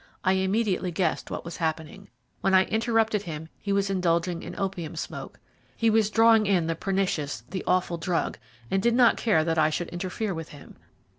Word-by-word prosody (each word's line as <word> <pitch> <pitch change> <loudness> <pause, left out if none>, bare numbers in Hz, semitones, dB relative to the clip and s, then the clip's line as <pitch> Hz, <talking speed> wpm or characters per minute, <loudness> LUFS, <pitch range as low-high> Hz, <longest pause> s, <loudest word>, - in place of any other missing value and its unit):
I 185 - +3
immediately 190 0 0
guessed 170 -1 -1
what - - -5
was 170 - -6
happening. 160 +4 -4 0.3
When 195 0 +2
I 185 - +7
interrupted 225 -1 +1
him 160 -3 -7
he 200 - -4
was 200 0 +1
indulging 175 -2 0
in - - -8
opium 185 -5 -3
smoke. - - -7 0.4
He 230 -1 +3
was 215 -1 +3
drawing 225 -1 +5
in 185 -5 +2
the 165 - 0
pernicious, 180 -5 -2
the 185 - -3
awful 180 -1 +1
drug, 170 0 -2 0.3
and 195 - +2
did 235 +2 +2
not 240 -2 +5
care 210 -9 +2
that 165 0 0
I 155 0 +4
should 170 +2 -3
interfere 185 +4 -3
with 165 -2 -6
him. 145 - -13
185 Hz, 190 wpm, -26 LUFS, 165-210 Hz, 0.4 s, I